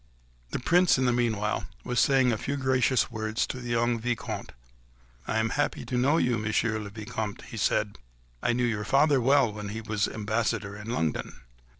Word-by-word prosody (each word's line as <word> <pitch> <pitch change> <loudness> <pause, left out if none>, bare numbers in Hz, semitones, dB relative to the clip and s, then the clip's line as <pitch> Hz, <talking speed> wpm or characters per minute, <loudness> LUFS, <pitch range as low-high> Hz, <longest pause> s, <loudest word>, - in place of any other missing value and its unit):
The - - -2
Prince 175 +7 +4
in 130 - +1
the 125 - +3
meanwhile 110 -3 0 0.2
was 125 -1 -1
saying 130 -3 +4
a 115 - 0
few 140 +5 -2
gracious 130 -1 +2
words 110 -1 -1
to 130 - -6
the 120 -1 -7
young 120 0 +1
Vicomte. 120 0 -3 0.8
"I 110 - 0
am 110 0 +1
happy 145 - -1
to 125 - -3
know 135 +6 +3
you, 120 -7 +1
Monsieur 110 +1 0
le 105 -1 -6
Vicomte," 105 0 -5
he 115 - -9
said. 105 0 0 0.4
"I - - +2
knew 125 +1 +1
your 110 -3 -1
father 140 +5 +3
well 135 -3 +4
when 105 -1 -6
he 110 +2 -4
was 105 -2 0
ambassador 110 -2 -2
in 105 +2 -8
London." 80 - -2
115 Hz, 190 wpm, -27 LUFS, 105-125 Hz, 0.8 s, Prince